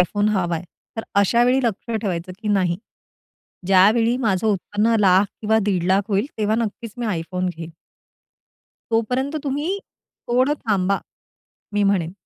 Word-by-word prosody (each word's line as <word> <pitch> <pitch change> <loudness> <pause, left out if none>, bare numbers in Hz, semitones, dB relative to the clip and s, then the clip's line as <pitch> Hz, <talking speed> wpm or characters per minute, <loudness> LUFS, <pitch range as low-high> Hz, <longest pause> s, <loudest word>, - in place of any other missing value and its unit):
iPhone 205 +4 +2
हवाय. 175 -5 -1 0.3
तर 225 - -3 0.2
अशावेळी 240 +6 +3
लक्ष 230 0 -2
ठेवायचं, 185 -3 -3
की 215 -1 -5
नाही, 185 -4 +2 0.9
ज्यावेळी 215 +5 +4
माझं 220 -4 0
उत्पन्न 210 +3 +1
1,00,000 195 -3 +4 0.2
किंवा 220 0 +2
1,50,000 190 -1 +2
होईल, 200 +3 +1
तेव्हा 215 0 +1
नक्कीच 230 0 -3
मी 240 - -3
iPhone 180 +2 -3
घेईन. 165 0 -8 1.2
तोपर्यंत 250 +6 0
तुम्ही 295 +8 -1 0.5
थोडं 255 +4 +3
थांबा 200 -2 +1 0.7
मी 205 - +1
म्हणेन. 185 -4 +1
205 Hz, 125 wpm, -21 LUFS, 185-230 Hz, 1.2 s, ज्यावेळी